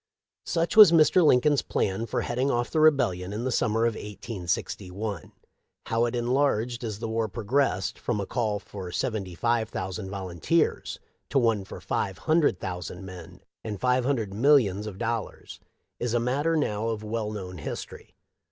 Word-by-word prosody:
" - - -65
Such 170 +3 0
was 215 -5 +10
Mr. 165 +2 +5
Lincoln's 145 0 +4
plan 105 +4 -1
for - - -1
heading 125 +3 -1
off 120 -2 0
the 160 - +1
Rebellion 100 -13 +3
in 105 +3 -4
the 130 - -1
summer 115 -2 +1
of 115 - +1
1861. 100 -2 -4 0.5
How 115 +1 +1
it 120 +1 -2
enlarged 120 -1 0
as 110 -3 -4
the 115 - -4
war 110 0 -1
progressed, 110 -2 0
from 120 -4 -2
a 100 - -2
call 110 -2 -1
for 95 -2 -8
seventy 95 -3 -3
five 115 +2 0
thousand 95 -1 -5
volunteers 95 - -1 0.3
to - - 0
one 115 -5 +2
for - - -9
five 95 -3 -2
hundred 155 - +2
thou 90 -1 -3
sand 90 +2 -8
men 90 -1 -10 0.2
and 105 -3 -5
five 125 +3 +2
hundred 120 -7 -1
millions 110 -4 +3
of 100 -3 -7
dollars, 115 0 -4 0.4
is 120 -1 -1
a - - +3
matter 140 +7 0
now 110 -6 -1
of 110 -2 -3
well 110 0 -3
known 90 -4 -6
history. - - -7
110 Hz, 170 wpm, -27 LUFS, 95-125 Hz, 0.5 s, was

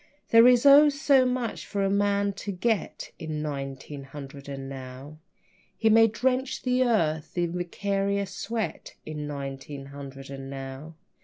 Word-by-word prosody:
There 230 +1 +8
is 250 +1 +5
oh, 285 +2 +9
so 280 -2 +3
much 250 -2 -2
for 200 -1 -1
a 195 - +2
man 200 0 +1
to 200 +1 -5
get 200 +3 -2
In 155 -1 -4
nineteen 140 -1 -5
hundred 140 0 -10
and 135 -1 -6
now. 135 +3 -9 0.6
He 220 -1 +3
may 225 +1 +7
drench 255 +4 -1
the 255 0 +2
earth 165 -11 0
in 175 -1 0
vicarious 200 +2 -1
sweat 225 0 -4
In 150 -1 -5
nineteen 140 0 -6
hundred 135 -1 -9
and 135 -1 -7
now. 135 +3 -7
175 Hz, 150 wpm, -27 LUFS, 140-225 Hz, 0.6 s, oh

